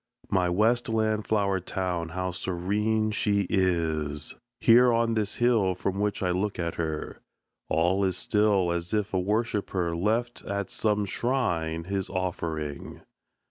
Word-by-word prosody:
My 90 -2 +2
westland 110 +1 +1
flower 100 -3 +1
town, 90 -2 -3
how 90 +2 -3
serene 105 +5 0
she 100 -2 +1
is! 80 -5 0 0.3
Here 120 +1 +6
on 115 0 +2
this 105 -2 -1
hill 115 -6 +2
from 95 +2 -2
which 105 -1 -1
I 90 - +1
look 95 +3 -1
at 85 -1 -2
her, 80 -2 -4 0.5
All 90 +5 +2
is 95 -2 0
still 100 -4 +2
as 85 +3 -2
if 105 -2 -1
a 95 - +2
worshipper 100 -4 -1
Left 115 +7 -1
at 100 -1 -3
some 105 -1 +1
shrine 90 -9 -1
his 95 +1 -3
offering. 85 -6 -4
95 Hz, 140 wpm, -27 LUFS, 85-110 Hz, 0.5 s, Here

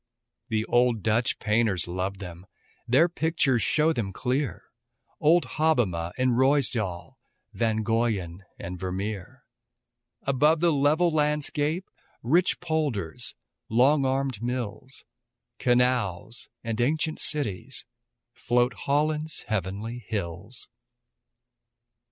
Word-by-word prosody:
The 110 -1 0
old 120 -3 +2
Dutch 115 +2 +1
painters 105 -5 +1
loved 95 +2 -3
them, 90 -1 -9 0.4
Their 135 +8 +5
pictures 160 -7 +1
show 155 +9 +2
them 105 -9 -2
clear, 130 +7 -2 0.6
Old 165 +3 +5
Hobbema 110 - +1
and 130 0 +2
Ruysduel, 120 -9 +1 0.4
Van 110 -2 0
Goyen 105 -6 -1
and 90 0 -6
Vermeer, 95 +1 -4 0.8
Above 150 +4 +3
the 170 +1 +3
level 155 +4 +3
landscape, 150 +3 0 0.4
Rich 170 +10 +2
polders, 135 - -2 0.3
long 135 +6 +4
armed 135 -4 -1
mills, 125 +1 -4 0.6
Canals 120 -5 +1
and 115 0 -2
ancient 155 +5 0
cities, 130 -4 -1 0.5
Float 120 +1 +1
Holland's 150 +3 0
heavenly 110 +4 -3
hills. 100 +3 -4
120 Hz, 100 wpm, -26 LUFS, 105-145 Hz, 0.8 s, Their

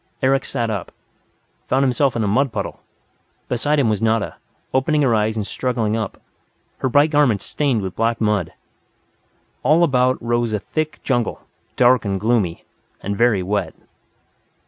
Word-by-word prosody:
Eric 135 +1 +2
sat 115 -1 -2
up, 100 -4 -4 0.8
found 135 +1 +2
himself 135 +1 +2
in 115 - 0
a - - 0
mud 130 +6 +2
puddle. - - -4 0.7
Beside 145 +5 0
him 140 -5 +3
was 105 -2 0
Nada, 110 -1 0 0.4
opening 145 +3 +2
her 125 -4 +3
eyes 110 0 +1
and 105 - -2
struggling 115 -2 -1
up, 110 -3 -4 0.6
her 130 - 0
bright 145 +4 +4
garments 140 - +2
stained 135 -8 0
with 95 -1 -5
black 115 +1 0
mud. 105 -6 0 1.1
All 155 +6 +4
about 130 -4 +2
rose 120 -1 0
a 105 - 0
thick 155 +8 -4
jungle, 120 -4 -1 0.3
dark 125 -2 +4
and 100 -2 -2
gloomy 105 -6 0 0.4
and 100 +1 -3
very 110 -3 +2
wet. 100 +3 -2
120 Hz, 155 wpm, -20 LUFS, 105-130 Hz, 1.1 s, bright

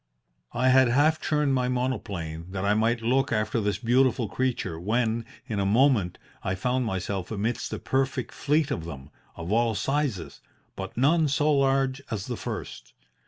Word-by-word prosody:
"I 130 +2 +3
had 130 0 +6
half 145 +6 +3
turned 150 -2 +1
my 125 -1 +1
monoplane, 100 -11 -3
that 95 0 -2
I 100 - +3
might 115 +2 +1
look 130 +3 +2
after 110 +1 0
this 100 -2 0
beautiful 120 0 +2
creature, 110 -7 -2
when, 115 +4 0 0.2
in 110 -6 -3
a - - +1
moment, 110 -3 +3 0.2
I 95 - -2
found 125 +6 0
myself 95 -2 -3
amidst 110 +2 -2
a - - -3
perfect 135 0 -1
fleet 150 0 +1
of 100 -12 -3
them, 70 -3 -9 0.2
of 85 +3 -6
all 115 0 +2
sizes, 135 - -2 0.3
but 95 +2 -7
none 155 +5 +3
so 150 +2 +2
large 135 -1 +2
as 105 -3 -3
the 125 - -4
first. 95 - -7
120 Hz, 165 wpm, -26 LUFS, 100-135 Hz, 0.3 s, had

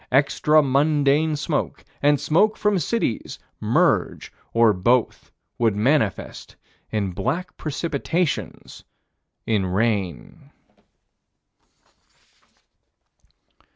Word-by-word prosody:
Extra 150 +3 +3
mundane 145 +2 +2
smoke 150 +1 -3 0.2
and 145 0 +3
smoke 205 +7 +2
from 210 -2 +1
cities 170 - -2 0.2
merge, - - 0 0.2
or 115 -2 +4
both 120 +6 0 0.3
would 115 -4 +2
manifest 110 0 -1 0.3
in 100 -3 -2
black 165 - -3
precipitations 160 +2 -3 0.6
in 105 -3 +1
rain. 100 -3 -2
140 Hz, 75 wpm, -22 LUFS, 110-155 Hz, 0.6 s, or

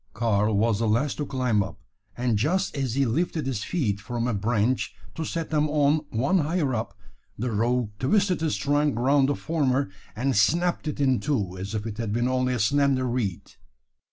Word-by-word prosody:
Karl 105 -1 +1
was 110 0 +2
the 115 - +1
last 120 +7 +1
to 145 - -3
climb 125 -6 +1
up; 100 0 -5 0.4
and 120 -2 +1
just 155 - 0
as 130 -4 -2
he 140 0 +2
lifted 155 +5 -1
his 125 -6 -2
feet 115 - -1
from 120 +4 -3
a 125 - 0
branch 110 +4 0 0.2
to 160 - -4
set 165 0 -4
them 150 -1 +2
on 150 +1 +2
one 135 +12 +1
higher 150 -3 0
up, 110 -1 -3 0.4
the 120 +2 -2
rogue 115 +1 0
twisted 185 +5 +2
his 160 -2 0
trunk 145 -2 +1
around 135 +3 +3
the 145 - +1
former, 140 -7 0 0.2
and 130 +3 0
snapped 170 - +2
it 150 - -3
in 130 -3 +3
two, 105 -12 -1
as 100 +4 -5
if 105 0 -3
it 110 -1 -6
had 115 -3 -2
been 120 +3 +1
only 130 0 +1
a - - -2
slender 135 +3 +2
reed. 120 -7 -3
130 Hz, 195 wpm, -26 LUFS, 110-145 Hz, 0.4 s, around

